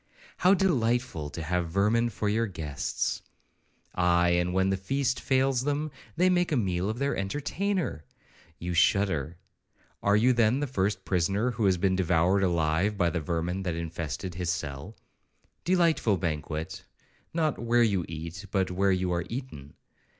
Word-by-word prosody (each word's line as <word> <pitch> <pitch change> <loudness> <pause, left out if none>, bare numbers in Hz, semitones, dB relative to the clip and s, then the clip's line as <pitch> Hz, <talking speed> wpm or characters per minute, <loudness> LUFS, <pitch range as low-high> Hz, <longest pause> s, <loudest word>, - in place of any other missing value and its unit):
—How 185 +2 +5
delightful 120 - 0
to 80 +2 -6
have 85 +1 -1
vermin 105 +6 +2
for 105 -1 -3
your 115 +3 +1
guests! 75 -8 -3 0.7
Aye, 90 -1 +3
and 85 0 +1
when 95 +1 +2
the - - +2
feast 130 +7 -1
fails 130 -1 +1
them, 145 +2 -1 0.2
they 180 +3 +3
make 180 -2 +2
a 145 - +2
meal 95 -3 0
of 110 - -3
their 140 +2 0
entertainer!—You 100 - -4
shudder—Are 90 +2 -1
you, 120 +4 +4
then, 120 +2 +3
the 145 - 0
first 100 -5 -1
prisoner 100 +7 +1
who 115 -3 -1
has 95 -2 +3
been 95 +1 +1
devoured 90 +1 +2
alive 85 +3 +1
by 85 -4 +2
the 85 - -2
vermin 85 +4 -2
that 90 -3 -2
infested 85 +1 -4
his 90 0 -3
cell?—Delightful 105 - -2
banquet, 80 -2 -4 0.5
not 160 -3 0
'where 120 +1 +3
you 100 -6 +1
eat, 85 +5 -7
but 95 -2 0
where 95 +2 +2
you 90 -1 0
are 85 -1 -1
eaten!' 115 - -7
95 Hz, 150 wpm, -28 LUFS, 85-120 Hz, 0.7 s, How